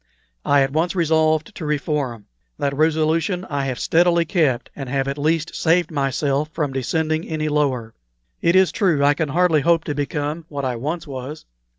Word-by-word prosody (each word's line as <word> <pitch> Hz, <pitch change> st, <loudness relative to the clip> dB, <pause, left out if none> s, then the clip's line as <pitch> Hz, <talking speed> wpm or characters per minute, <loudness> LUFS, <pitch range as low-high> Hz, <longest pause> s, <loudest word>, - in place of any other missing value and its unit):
I 140 Hz, -1 st, +4 dB
at 135 Hz, 0 st, -2 dB
once 170 Hz, +4 st, 0 dB
resolved 160 Hz, -2 st, +1 dB
to -, -, -8 dB
reform. 145 Hz, -7 st, -2 dB, 0.3 s
That 140 Hz, -1 st, -1 dB
resolution 160 Hz, +4 st, +1 dB
I 140 Hz, -1 st, -1 dB
have 130 Hz, -2 st, -3 dB
steadily 170 Hz, +3 st, +3 dB
kept, 150 Hz, -8 st, 0 dB
and 135 Hz, -3 st, -6 dB
have 135 Hz, 0 st, -1 dB
at 140 Hz, +1 st, -3 dB
least 160 Hz, +2 st, 0 dB
saved 170 Hz, +1 st, +1 dB
myself 140 Hz, +1 st, 0 dB
from 150 Hz, -4 st, -2 dB
descending 155 Hz, +5 st, -1 dB
any 155 Hz, -1 st, -1 dB
lower. 130 Hz, -7 st, 0 dB, 0.5 s
It 170 Hz, +2 st, +3 dB
is 190 Hz, -1 st, +5 dB
true, 165 Hz, -9 st, +2 dB
I 145 Hz, -, +5 dB
can 155 Hz, 0 st, -2 dB
hardly 165 Hz, 0 st, +3 dB
hope 165 Hz, +1 st, +3 dB
to 150 Hz, -, -3 dB
become 145 Hz, +2 st, -3 dB
what 140 Hz, -2 st, -4 dB
I 125 Hz, -2 st, -1 dB
once 155 Hz, +8 st, -4 dB
was. 140 Hz, +2 st, -7 dB
150 Hz, 180 wpm, -21 LUFS, 140-165 Hz, 0.5 s, is